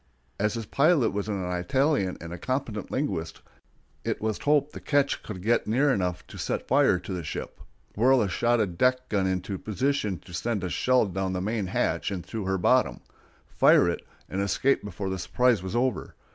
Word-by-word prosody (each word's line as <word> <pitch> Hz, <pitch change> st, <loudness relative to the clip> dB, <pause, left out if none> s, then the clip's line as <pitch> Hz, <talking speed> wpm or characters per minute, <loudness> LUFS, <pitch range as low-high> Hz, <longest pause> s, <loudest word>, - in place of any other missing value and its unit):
As 105 Hz, +2 st, +1 dB
his 115 Hz, -1 st, -4 dB
pilot 145 Hz, +2 st, +3 dB
was 100 Hz, 0 st, -2 dB
an 100 Hz, -3 st, -2 dB
Italian 130 Hz, -, +1 dB
and 85 Hz, +1 st, -8 dB
a 85 Hz, -, -7 dB
competent 130 Hz, -, -3 dB
linguist, 85 Hz, -, -3 dB, 0.6 s
it -, -, -2 dB
was 110 Hz, 0 st, -2 dB
hoped 150 Hz, 0 st, +2 dB
the -, -, -8 dB
ketch 145 Hz, -1 st, +1 dB
could 95 Hz, -4 st, -8 dB
get 115 Hz, +3 st, +2 dB
near 135 Hz, +6 st, +3 dB
enough 90 Hz, -2 st, -2 dB
to -, -, -11 dB
set -, -, -2 dB
fire -, -, +4 dB
to 90 Hz, +2 st, -6 dB
the 90 Hz, -, -3 dB
ship, 75 Hz, -, -6 dB, 0.3 s
whirl 125 Hz, +2 st, +4 dB
a -, -, 0 dB
shotted 105 Hz, -3 st, 0 dB
deck 130 Hz, 0 st, +2 dB
gun 100 Hz, -3 st, +1 dB
into 95 Hz, +1 st, -2 dB
position 110 Hz, -3 st, -1 dB
to 90 Hz, -, -14 dB
send 105 Hz, +2 st, -2 dB
a 90 Hz, -, -2 dB
shell 125 Hz, +7 st, +2 dB
down 95 Hz, -1 st, -2 dB
the 90 Hz, -, -1 dB
main 105 Hz, +1 st, -2 dB
hatch -, -, 0 dB
and 90 Hz, -3 st, -5 dB
through 105 Hz, +1 st, -5 dB
her 95 Hz, 0 st, 0 dB
bottom, 90 Hz, -, +2 dB, 0.5 s
fire -, -, +5 dB
it, -, -, -1 dB, 0.3 s
and 95 Hz, -, -2 dB
escape 100 Hz, +8 st, +1 dB
before 100 Hz, -1 st, -4 dB
the 95 Hz, -, -3 dB
surprise 125 Hz, -2 st, +2 dB
was 95 Hz, +4 st, -5 dB
over. 125 Hz, 0 st, -1 dB
105 Hz, 195 wpm, -27 LUFS, 95-125 Hz, 0.6 s, fire